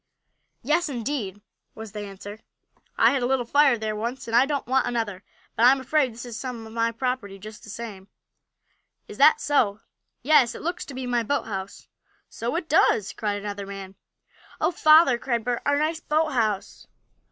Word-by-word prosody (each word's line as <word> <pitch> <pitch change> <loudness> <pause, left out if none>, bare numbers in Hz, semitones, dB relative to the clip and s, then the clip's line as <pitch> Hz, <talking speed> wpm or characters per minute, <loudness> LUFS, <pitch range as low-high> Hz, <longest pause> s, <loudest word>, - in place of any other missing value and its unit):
"Yes, 305 +5 +1
indeed," 230 -6 -4 0.3
was 220 -2 -9
the 210 - -7
answer. 205 +1 -8 0.6
"I - - +5
had 275 - 0
a 245 - +1
little 260 -2 0
fire 285 0 +4
there 215 -1 -3
once, 235 +5 -4
and 230 - -2
I 255 +3 +5
don't 285 -2 -2
want 260 +2 +1
another. 215 -5 -3 0.3
But 235 - +5
I'm 265 +2 +5
afraid 265 0 +1
this 235 +2 -9
is 240 -2 -7
some 245 -4 -6
of 220 - -11
my 230 0 +1
property 230 -4 -3
just 215 +2 -11
the - - -12
same." 205 -3 -8 1.0
"Is - - -11
that 455 - +7
so?" 225 - +1 0.4
"Yes, 260 -4 +4
it - - -9
looks 345 +2 -3
to 275 - -9
be 260 0 -4
my 245 -1 +1
boathouse." 205 -6 -4 0.4
"So 235 +6 -4
it 335 -1 -3
does!" 225 -9 +3
cried 205 -1 -2
another 200 -1 -6
man. 195 -1 -8 0.7
"Oh, - - +2
father!" 310 -6 +5
cried 235 -2 -1
Bert. 245 0 -2
"Our 285 0 +3
nice 315 +2 0
boathouse!" 265 -11 -1
235 Hz, 180 wpm, -25 LUFS, 210-275 Hz, 1.0 s, that